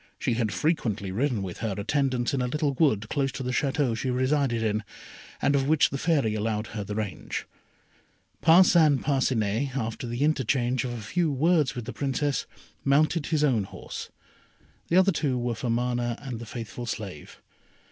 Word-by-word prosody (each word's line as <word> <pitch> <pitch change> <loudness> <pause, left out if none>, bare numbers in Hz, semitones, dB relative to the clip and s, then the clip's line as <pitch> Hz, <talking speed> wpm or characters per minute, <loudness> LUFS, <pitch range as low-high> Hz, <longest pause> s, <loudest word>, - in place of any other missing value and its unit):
She - - 0
had 115 -2 0
frequently 105 - -1
ridden 115 0 0
with 90 -2 -6
her 110 -4 -2
attendants 130 +3 0
in 135 - 0
a 125 - 0
little 145 +2 0
wood 125 -8 +2
close 135 +2 0
to 135 - -5
the 125 - -2
Château 135 -2 +1
she 130 +3 -2
resided 130 -2 +1
in, 110 -1 0 0.6
and 140 - +2
of 135 -1 +1
which 155 -3 +4
the 140 - -2
Fairy 145 -10 +2
allowed 110 0 -1
her 105 -2 -3
the 105 +1 -5
range. 105 -3 -4 1.0
Parcin 165 -3 +6
Parcinet, 130 -2 0
after 115 0 -3
the 120 +4 -2
interchange 130 -4 +1
of 120 - -3
a 120 - -6
few 160 - 0
words 150 -2 +2
with 120 -2 -5
the 130 - -6
Princess, 140 +1 -1 0.4
mounted 150 +3 +2
his 155 -3 +1
own 120 -9 +2
horse. - - -8 0.8
The 170 - +3
other 190 +1 +5
two 145 -6 0
were 120 0 -1
for 115 +2 -4
Mana 120 0 0
and 130 -5 -6
the 120 - -8
faithful 120 +1 -6
slave. 100 -9 -6
125 Hz, 180 wpm, -27 LUFS, 115-145 Hz, 1.0 s, Parcin